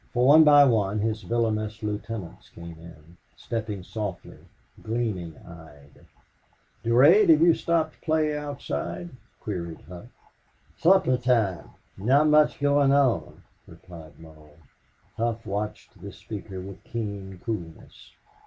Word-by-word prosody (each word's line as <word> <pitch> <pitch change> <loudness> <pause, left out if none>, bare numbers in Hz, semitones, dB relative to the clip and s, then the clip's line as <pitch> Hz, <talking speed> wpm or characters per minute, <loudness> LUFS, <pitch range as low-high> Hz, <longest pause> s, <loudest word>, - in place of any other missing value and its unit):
For 125 0 +2
one 155 +4 +8
by 145 -1 +7
one 105 -5 +1
his 110 0 -2
villainous 110 +1 -2
lieutenants 105 -3 -6
came 85 -1 -11
in, 85 0 -15 0.2
stepping 105 -4 -5
softly, 100 -2 -7 0.4
gleaming 110 -8 -3
eyed. 75 -4 -16 0.8
"Durade, 145 - +5
have 155 -1 +6
you 170 -1 +6
stopped 160 -1 -1
play 155 -2 0
outside?" 150 +4 -5 0.3
queried 85 -7 -6
Hough. 85 +5 -12 0.7
"Supper 175 -7 +3
time. 115 -7 0 0.3
Not 140 +9 +3
much 150 0 +3
going 145 -1 +3
on," 140 -4 +1 0.2
replied 85 -4 -14
Mull. 80 -2 -16 0.6
Hough 115 0 -2
watched 105 +2 -6
this - - -10
speaker 100 -3 -8
with 100 +2 -11
keen 100 -5 -6
coolness. 90 -9 -7
110 Hz, 115 wpm, -25 LUFS, 90-140 Hz, 0.8 s, one